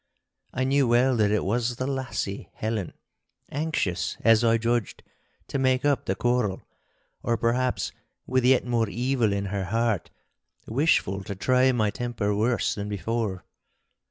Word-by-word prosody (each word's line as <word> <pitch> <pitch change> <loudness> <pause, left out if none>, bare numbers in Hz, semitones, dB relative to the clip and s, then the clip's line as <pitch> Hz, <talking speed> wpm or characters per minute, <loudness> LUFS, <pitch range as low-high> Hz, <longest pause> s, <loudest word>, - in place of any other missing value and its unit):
I 130 - -1
knew 135 0 +2
well 125 +2 +4
that 105 -2 +3
it 105 0 +1
was 120 +4 0
the 130 - -3
lassie 125 -7 -3
Helen, 110 -4 -3 0.6
anxious, 145 - -1
as 115 0 +5
I 115 0 +4
judged, 115 -2 -1 0.5
to 140 - -2
make 130 0 +2
up 145 -3 +2
the - - 0
quarrel; 120 -6 0 0.6
or, 115 - 0
perhaps, 120 +3 0 0.3
with 130 0 +1
yet 130 0 +4
more 115 -3 +1
evil 120 -1 0
in 100 0 -1
her 100 -2 -1
heart, 115 0 0 0.6
wishful 110 - +1
to 100 - -5
try 130 +7 +3
my 110 -4 +1
temper 115 -3 -2
worse 115 +3 +1
than 105 0 -5
before. 105 -1 -2
115 Hz, 150 wpm, -26 LUFS, 105-130 Hz, 0.6 s, as